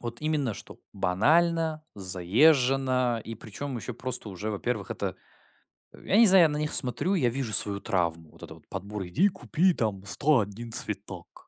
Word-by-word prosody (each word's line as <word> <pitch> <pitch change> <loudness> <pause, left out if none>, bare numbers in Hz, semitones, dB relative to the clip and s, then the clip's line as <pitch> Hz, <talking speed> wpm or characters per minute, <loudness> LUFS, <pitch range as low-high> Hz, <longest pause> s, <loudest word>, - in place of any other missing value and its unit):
Вот 120 +1 -7
именно, 150 -6 -1
что - - -11
банально, 160 - +1
заезжено, 125 - +2
и 115 - -7
притом 120 +5 -7
еще 120 +1 -6
просто 125 -3 -5
уже, 100 +3 -5
во-первых, 105 - -3
это, - - -4 0.8
я 200 - -1
не 230 - +8
знаю, 185 -4 +7
на 150 - -3
них 150 0 -2
смотрю, 130 - 0
я 125 -9 +2
вижу 120 -3 -3
свою 100 -1 +5
травму. 85 -3 -2
Вот - - -16
это - - -10
вот - - -21
подбор: 100 0 -6
"Иди 165 - +2
купи 185 -1 0
там 105 -7 -2
101 115 -3 0
цветок 100 -5 -6
120 Hz, 160 wpm, -27 LUFS, 100-150 Hz, 0.8 s, не